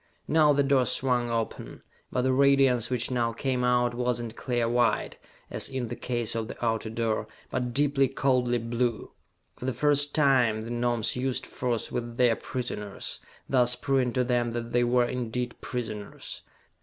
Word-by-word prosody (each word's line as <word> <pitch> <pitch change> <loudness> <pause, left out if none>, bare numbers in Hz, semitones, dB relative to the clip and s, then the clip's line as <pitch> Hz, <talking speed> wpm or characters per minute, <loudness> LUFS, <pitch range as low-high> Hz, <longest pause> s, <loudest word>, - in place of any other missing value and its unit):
Now 155 -1 +5
the 140 0 +3
door 135 -3 +3
swung 125 0 +1
open; 115 -1 -4 0.3
but 125 - 0
the 130 0 +2
radiance 135 -3 +4
which 125 0 0
now 120 -2 0
came 125 +1 -1
out 120 -1 +2
was 125 0 -1
not 120 -1 -6
clear 120 -3 -1
white, 120 0 +1 0.3
as - - 0
in 130 -3 -3
the 120 - -4
case 120 -2 -2
of 115 -1 -2
the 120 - -5
outer 110 -1 0
door, 110 -1 -1 0.2
but 125 -1 -1
deeply, 140 +1 +2
coldly 130 -3 +1
blue. 120 0 -2 0.5
For - - -7
the 130 - 0
first 145 +3 +2
time 125 -7 +3
the 115 - -6
Gnomes 120 -2 0
used 130 0 -2
force 120 -3 -3
with 120 -1 -4
their 120 -2 +4
prisoners, 105 -6 -5 0.3
thus 125 -2 +3
proving 130 -1 +1
to 125 - +2
them 120 -1 0
that 120 0 -4
they 120 0 +3
were 120 0 +3
indeed 120 0 -4
prisoners. 110 -5 -5
125 Hz, 170 wpm, -27 LUFS, 120-130 Hz, 0.5 s, Now